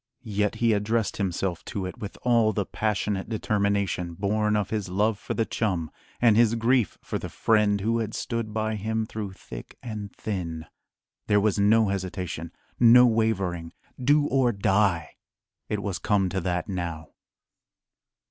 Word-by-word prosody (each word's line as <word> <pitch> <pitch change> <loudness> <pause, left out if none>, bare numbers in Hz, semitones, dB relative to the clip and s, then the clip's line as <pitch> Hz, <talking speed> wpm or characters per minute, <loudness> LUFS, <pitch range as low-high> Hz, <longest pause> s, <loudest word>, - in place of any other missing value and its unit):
Yet 105 0 +1
he 115 -1 +2
addressed 105 +2 0
himself 90 -2 -2
to 100 -2 -4
it 90 - -7
with 100 - -7
all 115 -3 +3
the 100 - -1
passionate 105 -1 -2
determination 100 -5 0
born 105 +3 +1
of 105 -2 -1
his 105 -4 -2
love 105 +3 +1
for - - -4
the 115 - +1
chum 90 -10 -1 0.3
and 115 -3 +5
his 115 0 +4
grief 115 -2 +2
for - - -3
the - - -6
friend 105 -2 +2
who 115 +3 +1
had 110 -2 -3
stood 115 -3 -3
by 110 0 -1
him 110 +2 -1
"through 105 -3 -5
thick - - -10
and 105 -4 -6
thin." 85 -6 -4 0.6
There 105 - +4
was 105 -1 +1
no 110 +1 +4
hesitation, 90 -4 -4 0.3
no 120 +1 +8
wavering. 95 -8 0 0.3
"Do 145 +3 +4
or 130 -4 +2
die!" 100 -4 +1 0.5
It 105 -1 -2
was 95 -4 -3
come 95 -1 +1
to 95 +1 -2
that 90 +4 -1
now. 85 -5 -4
105 Hz, 155 wpm, -26 LUFS, 95-110 Hz, 0.6 s, no